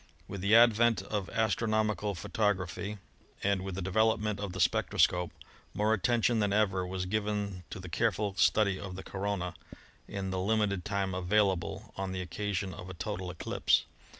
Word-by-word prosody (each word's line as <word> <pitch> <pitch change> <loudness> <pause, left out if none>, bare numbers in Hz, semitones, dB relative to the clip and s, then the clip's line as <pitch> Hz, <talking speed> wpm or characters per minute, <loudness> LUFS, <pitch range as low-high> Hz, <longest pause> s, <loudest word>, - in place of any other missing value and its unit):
With 100 - -6
the 100 +3 +4
advent 115 0 +5
of 100 -3 -3
astronomical 110 -2 0
photography, 100 +1 -1 0.5
and 100 -1 +2
with 95 -1 -5
the 95 - -3
development 105 +1 +1
of 100 -2 -3
the 95 - -6
spectroscope, 90 0 +2 0.5
more 105 +3 +2
attention 115 +2 +2
than 105 -2 +1
ever 95 -3 +1
was 90 0 -3
given 100 -2 -2
to 105 - -6
the 95 - -8
careful 100 - 0
study 100 -1 +3
of 95 -2 -6
the 95 - -7
corona 95 -2 -3
SOLAR - - -27
ENERGY - - -13 0.3
in - - -9
in 95 -1 -2
the 95 - -1
limited 100 -2 +1
time 100 -2 -1
available 95 0 0
on 95 -1 -3
the 95 - -3
occasion 95 +1 -3
of 90 +2 -9
a 95 - -7
total 95 0 -4
eclipse. - - +1
100 Hz, 175 wpm, -31 LUFS, 95-105 Hz, 0.5 s, advent